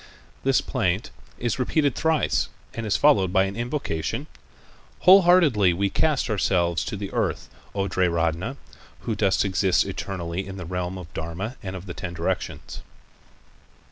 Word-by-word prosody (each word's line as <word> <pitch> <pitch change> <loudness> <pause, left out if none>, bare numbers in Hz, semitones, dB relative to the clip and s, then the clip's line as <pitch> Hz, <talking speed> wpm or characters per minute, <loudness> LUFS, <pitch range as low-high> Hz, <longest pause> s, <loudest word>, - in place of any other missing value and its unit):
This - - +3
plaint - - -1 0.3
is 120 +1 -2
repeated 140 +2 +1
thrice 160 +2 +1 0.2
and 115 -1 -4
is 100 - +2
followed 100 -12 +4
by 95 0 +4
an 95 0 -3
invocation: 120 - -3 0.8
"Wholeheartedly 175 - +6
we 100 +2 0
cast 155 -4 +1
ourselves 90 -6 +1
to 100 - -4
the 100 -1 -5
earth, - - -1 0.3
O 100 0 0
Triratna, 85 - 0 0.4
who 115 - -2
dost 100 -1 +2
exist 95 -1 +2
eternally 95 0 -4
in 95 0 -7
the 90 - -6
realm 90 +1 -3
of 85 -3 -10
dharma 85 +9 -4
of 95 -3 -6
the 90 - -6
ten 85 -1 -6
directions." 85 - -3
95 Hz, 140 wpm, -24 LUFS, 90-120 Hz, 0.8 s, Wholeheartedly